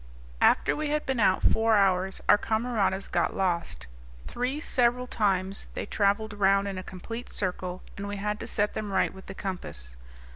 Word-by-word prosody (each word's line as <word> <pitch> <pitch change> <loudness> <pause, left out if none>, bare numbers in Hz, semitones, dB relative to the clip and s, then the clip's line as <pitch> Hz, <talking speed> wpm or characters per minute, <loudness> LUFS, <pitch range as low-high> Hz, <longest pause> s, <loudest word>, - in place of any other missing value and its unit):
After - - +4
we 305 0 -2
had 300 0 0
been 265 -2 -1
out 190 -3 +3
four 225 -1 +4
hours 190 -1 +2
our - - +8
camaradas 220 -4 0
got - - 0
lost; 170 - -1 0.4
three 250 +4 -2
several 250 -4 +2
times 195 -5 0
they - - -3
travelled 205 +1 +1
round 200 0 +3
in 195 -2 -4
a - - -7
complete 230 +7 -7
circle; 185 -1 -3
and 200 0 -4
we 205 - -4
had 210 +1 -2
to - - -6
set 205 0 0
them 210 -2 -4
right - - +1
with 190 0 -13
the 190 - -7
compass. 60 - -6
200 Hz, 180 wpm, -28 LUFS, 190-225 Hz, 0.4 s, our